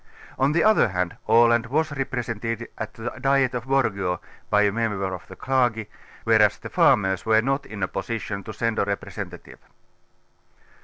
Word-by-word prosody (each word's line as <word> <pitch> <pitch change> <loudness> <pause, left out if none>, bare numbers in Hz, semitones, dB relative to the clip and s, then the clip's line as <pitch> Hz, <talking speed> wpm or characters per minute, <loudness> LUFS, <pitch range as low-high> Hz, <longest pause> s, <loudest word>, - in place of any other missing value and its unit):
On 135 +2 +3
the 170 - +3
other 215 - +5
hand 90 -3 -2
Aland 115 +1 +5
was 155 +5 0
re 135 -1 -2
presented 115 -2 -4
at - - -6
the 120 +1 -5
Diet 135 -1 +2
of 120 -1 -4
Borga 100 -9 0 0.3
by 105 0 +4
a 100 - +3
member 100 -4 -2
of 90 - -8
the - - -11
clergy, 120 -5 0 0.3
whereas - - +4
the - - -9
farmers 95 -1 +3
were 110 -1 +4
not 135 +2 -1
in 105 -3 -6
a - - +1
position 105 -3 -4
to 110 - -6
send 115 0 -1
a - - +2
re 100 0 0
presentative. - - -9
115 Hz, 175 wpm, -24 LUFS, 100-130 Hz, 0.3 s, other